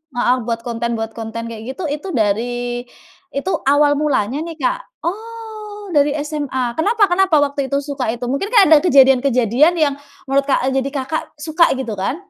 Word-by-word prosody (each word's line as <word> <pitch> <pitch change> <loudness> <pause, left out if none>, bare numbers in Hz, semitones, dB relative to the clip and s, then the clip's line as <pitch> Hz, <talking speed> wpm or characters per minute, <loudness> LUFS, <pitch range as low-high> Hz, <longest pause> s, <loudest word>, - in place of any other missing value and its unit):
heeh, 245 +1 +3
buat 230 -1 -1
konten 235 0 -2
buat 225 0 -3
konten 225 0 -5
kayak 225 -1 -8
gitu 365 - -6
itu 300 +6 -9
dari 210 +1 +1 0.9
itu 310 +7 -1 0.2
awal 290 0 +4
mulanya 270 -4 0
nih, 335 -1 -7
Kak. - - 0 0.3
Oh, 430 -1 -7
dari 290 0 +4 0.2
SMA 290 -4 -3 0.2
kenapa 415 +6 +2
kenapa 375 -2 +3
waktu 280 -1 0
itu 280 - +2
suka 280 -2 -4
itu 240 +2 -6
mungkin 280 +9 -1
kayak 425 -5 +6
ada 315 - +9
kejadian-kejadian 270 - +4
yang 285 -2 +1 0.3
menurut, 275 +1 +2
Kak 265 -2 +1
eee, - - +1
jadi 275 - -3
Kakak 280 +3 -2 0.2
suka 315 +3 +2
gitu 230 -5 -4
kan? 195 +9 -1
280 Hz, 175 wpm, -18 LUFS, 245-340 Hz, 0.9 s, ada